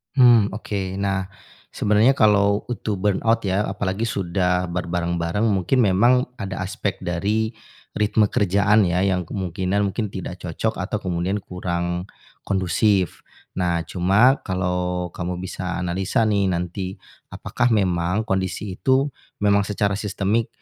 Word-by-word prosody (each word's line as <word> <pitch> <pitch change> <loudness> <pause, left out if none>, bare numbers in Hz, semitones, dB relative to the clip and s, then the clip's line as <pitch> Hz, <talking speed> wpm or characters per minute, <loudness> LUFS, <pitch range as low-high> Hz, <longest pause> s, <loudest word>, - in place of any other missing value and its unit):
Hmm, 120 -6 +6
oke. 95 -3 -4
Nah, 95 -1 -1 0.5
sebenarnya 105 +6 +3
kalo 100 -3 +3
untuk 110 -3 -2
burnout 110 +3 +1
ya, 100 +2 0
apalagi 100 +2 -2
sudah 90 -2 0
berbareng-bareng 85 +2 -1
mungkin 105 +4 +2
memang 105 +5 +4 0.3
ada 95 -2 -4
aspek 100 +1 -3
dari 105 +6 0 0.5
ritme 105 0 +2
kerjaan 100 +1 +3
ya, 90 +1 +1
yang 95 -2 +1
kemungkinan 95 +2 -2
mungkin 105 +3 -2
tidak 90 -1 -6
cocok 90 +6 -3
atau 105 +3 -2
kemudian 95 +2 -2
kurang 85 0 -3 0.4
kondusif. 95 0 +1 0.3
Nah, 85 -2 +1
cuma 100 - +3
kalo 90 -1 -1
kamu 90 0 -4
bisa 90 -1 -4
analisa 95 +5 0
nih 100 -2 +2
nanti, 90 +2 -3 0.4
apakah 120 -1 0
memang 90 -1 +1
kondisi 95 0 -2
itu, 135 +2 +2 0.3
memang 100 0 +3
secara 100 -1 0
sistemik 105 +2 -1
95 Hz, 125 wpm, -22 LUFS, 90-105 Hz, 0.5 s, Hmm